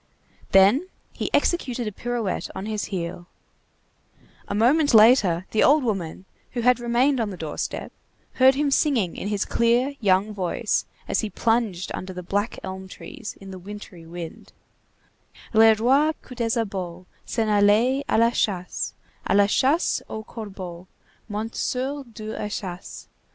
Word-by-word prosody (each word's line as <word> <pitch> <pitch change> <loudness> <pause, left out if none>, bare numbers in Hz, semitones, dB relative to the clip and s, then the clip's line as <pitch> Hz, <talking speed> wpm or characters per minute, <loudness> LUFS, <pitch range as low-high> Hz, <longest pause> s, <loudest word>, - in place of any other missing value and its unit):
Then 205 - +5 0.3
he - - -3
executed 250 -8 +1
a 210 - -3
pirouette 235 -1 -3
on 190 - -5
his 215 -2 -2
heel; 175 -2 -5 1.2
a - - -3
moment 270 +5 +4
later, 210 -6 +6
the 220 - +2
old 295 0 +5
woman, 190 -6 -3 0.3
who 245 - -1
had 250 +1 +4
remained 245 +3 +2
on 225 -3 0
the 190 - -7
door 160 -2 -6
step, - - -4 0.5
heard 260 +1 +7
him 285 0 +1
singing 255 - +2
in - - -5
his 205 -1 -1
clear, 240 +4 +2
young 200 0 +2
voice, 185 -4 -1 0.2
as - - 0
he 215 - -1
plunged 225 -5 0
under 185 0 -5
the 180 0 -7
black 205 +5 -1
elm 190 0 -6
trees, 200 - -9
in 195 -1 -10
the 185 - -8
wintry 185 -3 -10
wind:— 170 -1 -9 1.0
"Le 225 0 +7
roi 270 +8 +3
Coupdesabot 205 -7 -3 0.2
S'en 225 -2 0
allait 215 +6 +3
à - - +3
la 230 +1 +4
chasse, 185 -6 -2 0.3
À - - +3
la 200 0 +6
chasse 270 - +2
aux 220 - -5
corbeaux, 190 -6 -8 0.4
Monté 215 +2 -4
sur 270 +3 -2
deux 220 -2 -8
échasses. 195 -3 -6
215 Hz, 150 wpm, -24 LUFS, 190-245 Hz, 1.2 s, heard